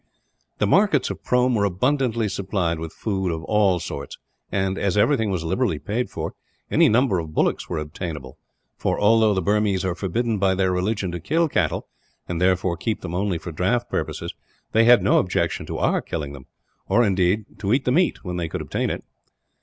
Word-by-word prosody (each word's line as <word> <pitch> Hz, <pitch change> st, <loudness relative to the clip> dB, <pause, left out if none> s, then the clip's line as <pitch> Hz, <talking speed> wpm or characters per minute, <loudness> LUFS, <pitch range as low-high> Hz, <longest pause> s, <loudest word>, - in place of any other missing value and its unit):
The -, -, +1 dB
markets 190 Hz, -10 st, +3 dB
of -, -, -8 dB
Prome 125 Hz, 0 st, +2 dB
were 105 Hz, -3 st, +2 dB
abundantly 115 Hz, +3 st, +1 dB
supplied 95 Hz, -4 st, -1 dB
with 80 Hz, 0 st, -5 dB
food 95 Hz, -4 st, -2 dB
of 80 Hz, 0 st, -4 dB
all 100 Hz, -2 st, +3 dB
sorts 85 Hz, -, -6 dB, 0.3 s
and, 95 Hz, 0 st, 0 dB
as 100 Hz, 0 st, 0 dB
everything 110 Hz, 0 st, +3 dB
was 90 Hz, -4 st, -2 dB
liberally 95 Hz, +1 st, 0 dB
paid 110 Hz, +10 st, -2 dB
for, -, -, -5 dB, 0.4 s
any -, -, +5 dB
number 115 Hz, -4 st, +3 dB
of 80 Hz, -2 st, -7 dB
bullocks -, -, +1 dB
were -, -, -2 dB
obtainable 75 Hz, -3 st, -6 dB, 0.4 s
for, -, -, -1 dB
although 110 Hz, 0 st, +4 dB
the 95 Hz, -, 0 dB
Burmese 100 Hz, -1 st, +1 dB
are 90 Hz, -, 0 dB
forbidden 105 Hz, +5 st, -1 dB
by 95 Hz, -1 st, +2 dB
their 95 Hz, -1 st, +1 dB
religion 95 Hz, +1 st, -1 dB
to 85 Hz, -, -4 dB
kill 160 Hz, -, +1 dB
cattle, -, -, -1 dB, 0.4 s
and 85 Hz, -1 st, -3 dB
therefore 90 Hz, -1 st, +2 dB
keep 110 Hz, +4 st, -2 dB
them 85 Hz, -2 st, -6 dB
only 95 Hz, -1 st, 0 dB
for 85 Hz, -, -7 dB
draught 115 Hz, +10 st, 0 dB
purposes, -, -, -3 dB, 0.4 s
they 115 Hz, +1 st, +4 dB
had 120 Hz, -5 st, +6 dB
no 100 Hz, -, +4 dB
objection 90 Hz, -, -1 dB
to -, -, -4 dB
our -, -, +1 dB
killing 70 Hz, -2 st, -5 dB
them; 70 Hz, -2 st, -11 dB, 0.4 s
or 120 Hz, -, +4 dB
indeed, 95 Hz, 0 st, +2 dB
to 100 Hz, -1 st, -1 dB
eat 135 Hz, +3 st, +2 dB
the 125 Hz, -, +2 dB
meat, 175 Hz, +6 st, +2 dB
when 90 Hz, -3 st, -4 dB
they 85 Hz, -2 st, -2 dB
could -, -, -4 dB
obtain -, -, -2 dB
it. -, -, -4 dB
95 Hz, 195 wpm, -23 LUFS, 90-115 Hz, 0.4 s, had